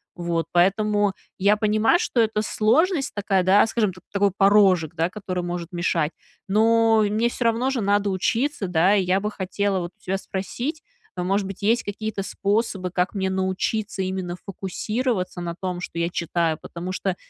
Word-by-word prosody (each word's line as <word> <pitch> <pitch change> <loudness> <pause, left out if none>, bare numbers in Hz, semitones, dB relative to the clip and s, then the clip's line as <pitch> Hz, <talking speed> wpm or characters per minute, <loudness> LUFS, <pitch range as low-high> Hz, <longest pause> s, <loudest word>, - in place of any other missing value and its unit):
Вот, 170 -1 -2
поэтому 205 +3 +2 0.3
я 200 +2 +4
понимаю, 215 +7 +3
что 255 - -1
это 220 -1 +1
сложность 275 - +1
такая, 195 -2 +1
да, 190 +3 +5
скажем, 215 -4 0
т 185 - -15
такой 200 0 +2
порожек, 195 -5 +4
да, 165 +2 0
который 185 -2 -4
может 175 -1 -5
мешать, 170 -3 0 0.4
но 225 +1 +4
мне 220 +3 +1
всё 240 - -4
равно 230 +3 +2
же 270 -2 -1
надо 205 0 +2
учиться, 225 +5 0
да, 180 +3 +3
и 195 - +2
я 185 +2 +1
бы 210 +1 -2
хотела 195 0 -1
вот 175 -1 -5
у - - -32
тебя 190 +1 -1
спросить, 240 - -4 0.3
э, 180 - -1
может 195 +2 0
быть, 195 +1 -8
есть 230 +3 +2
какие-то 205 0 -4
способы, 200 -1 -1
как 180 +3 -1
мне 190 -1 0
научиться 190 +2 -1
именно 185 -2 -3
фокусироваться 200 +1 -3
на 170 -1 -4
том, 180 -2 -3
что 175 - -7
я 170 - 0
читаю, 170 -2 -1
потому 175 +2 -6
что 185 0 -2
195 Hz, 175 wpm, -23 LUFS, 180-215 Hz, 0.4 s, да